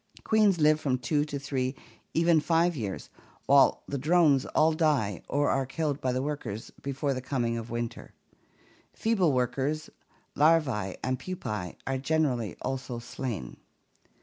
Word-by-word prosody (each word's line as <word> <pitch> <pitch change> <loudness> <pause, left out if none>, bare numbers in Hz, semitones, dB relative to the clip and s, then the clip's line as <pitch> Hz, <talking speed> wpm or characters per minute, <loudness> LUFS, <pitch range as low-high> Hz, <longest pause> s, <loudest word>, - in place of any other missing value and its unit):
Queens 210 -5 +3
live 155 0 +4
from 135 -4 0
two 145 +3 0
to 150 -1 -4
three, 135 -2 -2 0.4
even 165 0 +4
five 170 +2 +2
years, 105 -8 -5 0.3
while 140 -1 +5
the 140 - -3
drones 150 -2 +3
all 160 +1 +3
die 140 - +1
or 145 +1 +1
are 135 - +1
killed 145 +2 -2
by 130 - 0
the 130 +1 -1
workers 120 -7 -5
before 140 +1 -1
the 130 - -4
coming 125 -3 -1
of 115 0 -5
winter. 120 0 -5 0.8
Feeble 200 -8 +2
workers, 135 +4 -1 0.4
larvae, 140 - +2
and 130 0 -1
pupae 105 - -5
are 135 0 -1
generally 130 - 0
also 130 -1 -3
slain. 115 - -5
135 Hz, 145 wpm, -28 LUFS, 125-155 Hz, 0.8 s, while